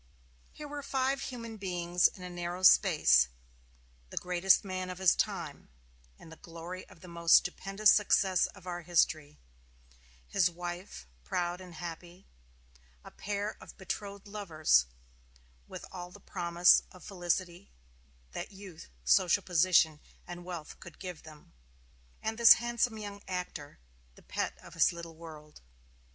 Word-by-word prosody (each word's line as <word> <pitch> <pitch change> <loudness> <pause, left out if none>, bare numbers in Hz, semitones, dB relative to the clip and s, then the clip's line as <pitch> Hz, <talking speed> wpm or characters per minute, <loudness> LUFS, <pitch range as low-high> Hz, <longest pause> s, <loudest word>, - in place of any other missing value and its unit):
Here 300 - -9
were 290 0 -6
five 270 0 -1
human 230 -4 -7
beings 175 -2 +1
in 185 - -12
a 180 - -6
narrow 175 +1 -5
space 155 - +6 0.8
the - - -12
greatest 180 +2 +3
man 185 -1 -4
of 180 - -6
his 185 -2 +4
time, - - -3 0.5
in - - -14
the 160 - -12
glory 170 +2 -9
of - - -17
the 180 - -12
most 170 -1 +4
stupendous 195 +1 +3
success 190 -3 +3
of 195 -3 -15
our 175 -1 -5
history; 155 -3 +1 0.9
his 180 -3 +2
wife, 175 - -7 0.2
proud 175 - -2
and 180 -2 -11
happy; 175 +2 -9 0.8
a - - -12
pair 205 +1 -4
of - - -13
betrothed 200 +1 -6
lovers, 160 - +2 0.8
with - - -9
all 180 -1 -7
the 205 - -14
promise 175 -2 +3
of 185 - -15
felicity 175 -2 -3 0.6
that - - -6
youth, 190 -4 -12
social 185 - +3
position, 170 -3 +3 0.3
and 175 0 -8
wealth 175 -4 -8
could 170 -4 -12
give 180 -4 -8
them; 155 - -15 0.7
and 220 +1 -3
this 235 - +10
handsome 240 -1 -1
young 205 -1 -7
actor, 180 -6 -6 0.4
the - - -18
pet - - -3
of - - -13
his - - +4
little 170 -1 -9
world. 155 -2 -12
180 Hz, 140 wpm, -31 LUFS, 170-200 Hz, 0.9 s, this